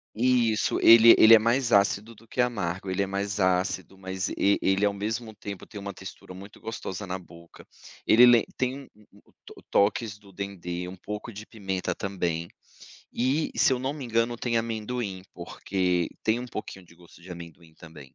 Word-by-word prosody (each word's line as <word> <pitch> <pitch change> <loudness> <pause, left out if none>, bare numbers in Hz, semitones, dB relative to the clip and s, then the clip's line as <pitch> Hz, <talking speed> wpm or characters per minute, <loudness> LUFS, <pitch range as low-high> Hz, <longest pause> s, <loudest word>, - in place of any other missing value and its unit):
Isso, 120 -2 +2
ele 115 0 +9
ele 115 +1 +9
é - - +6
mais 120 +2 +1
ácido 100 +2 +2
do 115 +2 -20
que 125 - -1
amargo, 95 -6 -2
ele 95 +2 0
é - - -1
mais 100 +1 -3
ácido. 95 +1 0
Mas 95 0 -4
e 100 +1 +2
ele 95 +1 +1
ao 100 - +2
mesmo 110 +2 -4
tempo 100 -3 -8
tem 105 - -9
uma 100 0 -6
textura 95 0 -11
muito 100 +3 -12
gostosa 105 -3 -6
na 95 0 -4
boca, 85 -1 -16 0.4
ele 120 +3 +7
lem 120 -2 +6
Tem 130 0 -1
um 140 - -12 0.2
o 100 - -20
o - - -27 0.3
o - - -17
toques 105 +1 +1
do 100 -1 -18
dendê, 90 -2 -5
um 95 - -8
pouco 105 +5 -7
de 105 +1 -9
pimenta 95 -4 -4
também. 85 -3 -3 0.7
E, 135 +6 0
se 135 - +3
eu 125 - 0
não 130 +2 -2
me 145 -3 -7
engano, 115 0 0
tem 115 0 -2
amendoim, 110 -3 -3
porque 90 0 -2
tem 110 +1 +1
um 125 - -6
pouquinho 105 -5 -8
de 85 - -19
gosto 85 0 -19
de 95 - -13
amendoim 85 -1 -11
também. 80 -6 -14
100 Hz, 190 wpm, -26 LUFS, 95-115 Hz, 0.7 s, ele